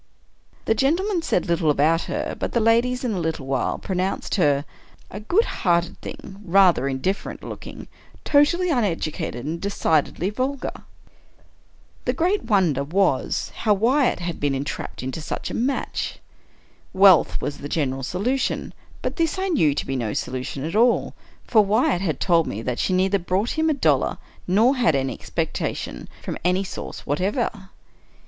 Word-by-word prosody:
The - - +3
gentlemen 340 - +1
said 185 - 0
little 170 -2 +1
about 155 +3 +2
her; - - -3
but - - -3
the 235 - +3
ladies, 235 +3 +2
in 245 - 0
a 195 - -1
little 160 -4 -2
while, 135 -1 -1
pronounced 185 0 -2
her 145 -6 +2 0.2
" - - -28
a 200 - -6
good 350 - +2
hearted 170 -2 0
thing, 195 +1 -9
rather 185 -6 +4
indifferent 140 +9 -3
looking, - - -8 0.4
totally 330 +5 +3
uneducated, 165 - -1
and 165 +3 -4
decidedly 180 -2 0
vul 260 +6 -1
gar." 275 - -7 1.2
The - - +1
great 365 - 0
wonder 180 - +2
was, 170 -2 0
how 210 -2 +2
Wyatt 245 +3 +2
had 170 -1 -4
been 145 -1 0
en 135 - -2
trapped 145 - -6
into 130 +5 -4
such - - -4
a - - -4
match. 260 +4 -2 0.8
Wealth 190 -4 +6
was 145 - -4
the 145 - -6
general 135 -4 -1
solu 200 - -1
tion - - -2
— - - -24
but - - -3
this 330 +1 0
I 380 +1 -1
knew 160 - +3
to - - -2
be 135 - -3
no 115 -5 -2
solution 130 +1 -4
at 165 +5 -4
all; 240 +3 +3 0.3
for 215 -3 +4
Wyatt 200 -3 +2
had 160 -8 -1
told 170 -3 +3
me 110 +3 -4
that 125 -1 -2
she - - 0
neither 190 +2 +2
brought 190 +6 0
him 320 0 +1
a - - +3
dollar 275 - +2 0.3
nor 225 +9 +4
had 240 - +3
any 135 -1 0
expectations 60 - -4
from - - -4
any 180 +2 +2
source 190 - -7
whatever. 190 - -1
190 Hz, 170 wpm, -23 LUFS, 150-235 Hz, 1.2 s, Wealth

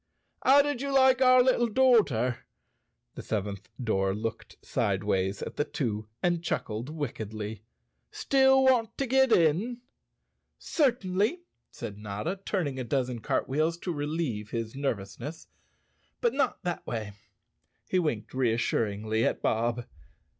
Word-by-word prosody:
"How 280 +2 +7
did 290 -3 -2
you 280 0 -2
like 265 -1 +5
our 255 -1 +7
little 245 -2 +3
doorter?" 205 - +2 0.7
The - - -7
seventh 100 -2 -4
door 95 -5 0
looked 115 +2 -5
sideways 95 -1 0
at - - -7
the - - +2
two 110 -8 -3 0.2
and 175 -1 +1
chuckled 115 -6 -3
wick¬ 145 -7 -3
edly. 105 0 -6 0.5
"Still 265 -1 +4
want 250 -4 +3
to 275 - 0
get 265 0 +3
in?" 195 +9 +2 0.8
"Certainly," 235 - 0 0.3
said 105 -3 -8
Notta, 105 - -4
turning 150 -11 -2
a - - -2
dozen 125 -1 -1
cartwheels 155 +9 0
to 175 0 -4
relieve 145 -8 -3
his 115 -1 -4
nervousness, 135 +4 -4 0.7
"but 475 - +1
not 275 -1 0
that 175 -2 -3
way." 110 -4 -4 0.7
He 185 - +1
winked 120 -11 -2
reassuringly 110 -3 0
at - - 0
Bob. 120 +1 0
140 Hz, 130 wpm, -28 LUFS, -, 0.8 s, How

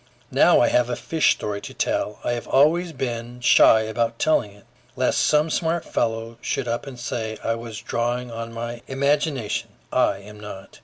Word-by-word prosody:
Now - - +5
I - - +4
have 125 0 +2
a 120 - -1
fish 160 +4 +2
story 100 -1 -4
to - - -9
tell. 105 - -1
I - - 0
have 120 -1 -3
always 165 +5 +3
been 120 -3 -4
shy 115 -2 +6
about 115 +1 -1
telling 140 -9 +2
it, 100 0 -19 0.3
lest - - +1
some 155 +1 +3
smart 165 +1 0
fellow 115 0 -2
should 135 - -2
up 120 +3 -2
and 130 -3 -8
say 110 -2 -4
I 115 - +1
was 115 -2 -7
drawing 120 +1 -2
on 115 0 -6
my 120 +1 -5
imagination: 140 -3 0 0.2
I 100 - +3
am 105 +2 -12
not. 100 -2 -10
120 Hz, 185 wpm, -23 LUFS, 115-135 Hz, 0.3 s, shy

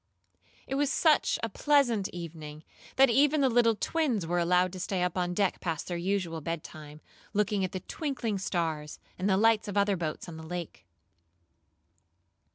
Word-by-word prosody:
It - - -5
was 280 0 +1
such 315 -3 +3
a 230 - -1
pleasant 240 -5 +2
evening, 155 -3 -8 0.3
that 270 -2 +6
even 285 +4 +4
the 265 - +4
little 230 -1 +4
twins 255 - 0
were 175 +2 0
allowed 180 +1 +2
to 185 - -7
stay 185 0 -1
up 180 -2 -1
on 180 -1 -1
deck 200 -1 +1
past 165 -3 -3
their 175 - -3
usual 175 -2 -2
bedtime, 155 -2 -7 0.3
looking 205 -1 +1
at 185 - -2
the 185 - -5
twinkling 240 - -3
stars, 160 -5 -2 0.2
and 190 +2 0
the 190 - +3
lights 225 +1 +3
of 205 0 -3
other 200 0 +3
boats 165 -2 -4
on 165 -2 -8
the 160 - -9
lake. 170 - -7
185 Hz, 170 wpm, -29 LUFS, 170-225 Hz, 0.3 s, that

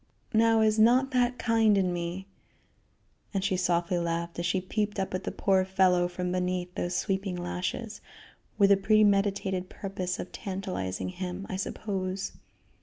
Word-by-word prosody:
Now 225 0 +4
is 215 0 +3
not 250 +5 +5
that 250 -1 +2
kind 225 -3 +3
in 185 -2 +1
me?" 175 +2 -4 1.1
And 195 - 0
she 190 - +1
softly 175 -1 +1
laughed 170 0 -2
as 170 - 0
she 185 +2 +1
peeped 205 +2 -2
up 190 - -2
at 185 - -3
the - - -2
poor 190 -1 +2
fellow 185 -2 +3
from 180 0 -3
beneath 180 0 -2
those 175 0 -2
sweeping 195 -1 -1
lashes, 180 +5 -4 0.6
with 200 -1 +5
the 200 - +7
premeditated 195 -2 +2
purpose 185 -2 -4
of - - -6
tantalizing 185 - -4
him, 185 +1 -5
I - - -2
suppose. 190 -1 -3
190 Hz, 155 wpm, -28 LUFS, 180-205 Hz, 1.1 s, the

